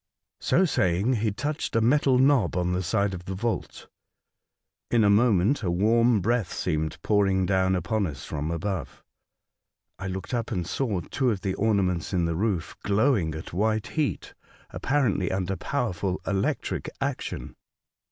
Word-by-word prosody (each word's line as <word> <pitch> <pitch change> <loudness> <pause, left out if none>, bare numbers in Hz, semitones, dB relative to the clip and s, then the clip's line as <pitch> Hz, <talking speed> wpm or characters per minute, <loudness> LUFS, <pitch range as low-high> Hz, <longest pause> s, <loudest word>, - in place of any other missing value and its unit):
So 190 - +3
saying, 100 - +1
he 110 -1 +1
touched 145 +8 -3
a - - +5
metal 130 +3 +3
knob 130 -6 +3
on 90 0 0
the 90 - 0
side 100 +2 0
of 90 -1 -7
the 95 - -4
vault. 115 +4 -3 1.0
In 115 -2 +3
a 100 - +5
moment 110 +2 +3
a 95 - -1
warm 110 +5 +3
breath 115 -2 0
seemed 80 0 -2
pouring 95 -3 +2
down 95 0 +2
upon 95 +3 0
us 70 -4 -7
from 75 +1 -3
above. 95 +4 -4 1.0
I 95 - -4
looked 95 +4 -5
up 115 -2 -2
and 90 -6 -1
saw 105 - -1
two 130 - -1
of 105 -5 -1
the 95 -3 -1
ornaments 95 -6 0
in 90 -2 +2
the 85 - 0
roof 95 -3 -1
glowing 100 - +2
at 80 - -8
white 110 +3 +1
heat, 155 -3 -2 0.4
apparently 120 -10 0
under 95 0 -1
powerful 95 -7 -2
electric 100 0 -1
action. - - -4
100 Hz, 155 wpm, -26 LUFS, 90-115 Hz, 1.0 s, a